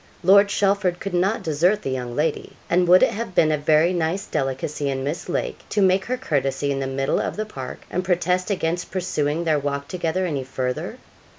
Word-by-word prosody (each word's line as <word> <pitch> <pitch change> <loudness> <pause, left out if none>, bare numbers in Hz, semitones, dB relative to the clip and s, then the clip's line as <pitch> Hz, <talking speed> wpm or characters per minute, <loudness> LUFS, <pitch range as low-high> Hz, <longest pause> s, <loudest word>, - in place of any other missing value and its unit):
Lord 200 +3 +6
Chelford 200 -3 +1
could 195 - -5
not 190 +5 +1
desert 175 +7 +1
the 135 - -2
young 125 -2 -4
lady, 155 0 -1 0.2
and 180 +1 +3
would 180 +1 +7
it - - +4
have 205 -3 -5
been 155 -1 +4
a 155 - +2
very 155 +4 +3
nice 175 +3 -1
delicacy 140 +2 -2
in 135 -1 -2
Miss 150 +6 -4
Lake - - -2
to 210 - -1
make 190 -1 +3
her 255 +1 -2
courtesy 140 - -1
in 135 - -1
the 135 - -2
middle 135 0 0
of - - -2
the 215 - -3
park, 135 -11 -8
and 180 - -1
protest 180 +1 0
against 175 -3 -1
pursuing 165 -4 -1
their 155 -3 +2
walk 140 0 -3
together 180 +1 -1
any 145 -6 -2
further? 130 -1 -4
170 Hz, 205 wpm, -23 LUFS, 140-185 Hz, 0.2 s, would